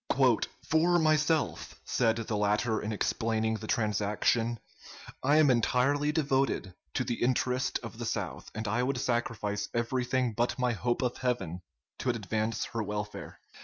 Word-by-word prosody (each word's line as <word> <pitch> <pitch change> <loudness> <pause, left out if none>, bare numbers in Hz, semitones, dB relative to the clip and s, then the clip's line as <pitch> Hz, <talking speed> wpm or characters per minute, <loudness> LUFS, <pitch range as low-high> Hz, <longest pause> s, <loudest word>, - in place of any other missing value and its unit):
"'For 170 +2 +3
myself,' 155 -1 +1
said 115 -2 +2
the 115 -1 -3
latter 105 +2 +1
in 105 - -3
explaining 110 +1 0
the 110 0 -8
transaction, 110 +2 +1 0.6
'I 145 +3 +3
am 150 -3 +6
entirely 135 +5 +2
devoted 135 - 0 0.2
to - - +1
the 120 - -3
interest 125 +1 +1
of - - -8
the - - -3
South, - - -3
and 110 0 -3
I 115 +4 +1
would 130 +1 0
sacrifice 115 -4 -1
everything 125 +1 0
but 120 +3 0
my 125 -1 +1
hope 120 +4 -1
of 125 -1 -1
heaven 95 -9 -2 0.4
to 130 - -1
advance 110 0 -1
her 115 - -1
welfare.' 105 0 -5
120 Hz, 145 wpm, -30 LUFS, 110-130 Hz, 0.6 s, am